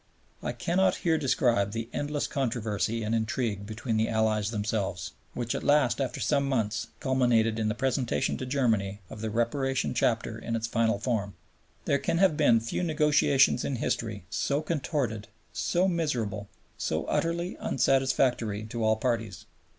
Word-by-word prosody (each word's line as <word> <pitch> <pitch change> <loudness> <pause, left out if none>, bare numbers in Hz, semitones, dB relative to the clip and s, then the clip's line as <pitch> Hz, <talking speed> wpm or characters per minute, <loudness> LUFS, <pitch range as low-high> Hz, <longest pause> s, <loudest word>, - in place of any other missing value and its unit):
I - - -2
cannot 175 +10 +1
here 160 -2 +3
describe 120 -7 +2
the 115 0 -3
endless 145 0 -1
controversy 115 -4 -1
and 110 +1 -1
intrigue 110 -2 -1
between 115 +1 -2
the 110 +1 +1
Allies 110 -2 +1
themselves, 105 -5 -2 0.2
which 120 -1 -2
at - - -3
last 145 -3 +3
after 130 - -2
some 140 -2 +1
months 115 -4 -1
culminated 120 -4 +2
in 110 - 0
the 105 - 0
presentation 130 -1 0
to 130 - -4
Germany 110 -7 0
of 105 - -8
the 110 - -2
Reparation 130 +5 0
Chapter 115 -2 0
in 115 0 -3
its 115 0 -1
final 115 -2 +1
form. 105 -3 -2 0.5
There 140 - +2
can 165 - 0
have 185 -3 +4
been 120 -7 +4
few 115 +9 -3
negotiations 150 -6 +3
in 135 - -1
history 110 -4 -2
so 140 +8 0
contorted, 135 -8 -2 0.3
so 180 +2 +1
miserable, 120 - -1 0.3
so - - -1
utterly 170 +2 -1
unsatisfactory 130 -5 +1
to 115 -1 -2
all 110 0 +4
parties. 110 -5 -2
115 Hz, 155 wpm, -28 LUFS, 110-135 Hz, 0.5 s, have